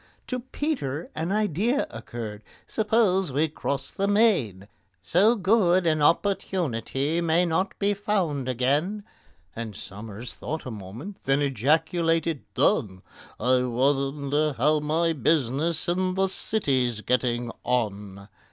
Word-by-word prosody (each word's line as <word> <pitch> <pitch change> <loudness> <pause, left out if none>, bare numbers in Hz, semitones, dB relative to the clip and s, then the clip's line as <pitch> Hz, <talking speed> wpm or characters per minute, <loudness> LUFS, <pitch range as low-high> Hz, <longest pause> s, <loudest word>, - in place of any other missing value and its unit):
To 255 - -3
PETER 240 - -3
an 165 +3 -3
idea 215 - +1
occurred. 110 -2 -7 0.2
"Suppose 210 -6 +2
we 150 +5 +2
cross 140 -2 -3
the 195 - -1
main? 185 - +2 0.4
So 205 - +4
good 190 -4 +3
an 155 -2 +2
opportunity 160 - 0
may 170 +1 +3
not 180 +4 -1
be 200 +1 +2
found 180 -10 -1
again." 145 - 0 0.5
And 115 -3 -5
SOMERS 105 +5 -8
thought 160 +1 -5
a 130 - -5
minute, 110 - -8
then 135 +2 +2
ejaculated, 160 - +1
"Done! 95 -3 +1 0.4
I 125 0 +3
wonder 140 +4 0
how 150 +5 +2
my 160 +3 +1
business 150 +2 +1
in 185 +1 0
the 190 0 +2
City's 130 - 0
getting 120 0 0
on?" 100 -5 -2
150 Hz, 120 wpm, -26 LUFS, 125-185 Hz, 0.5 s, So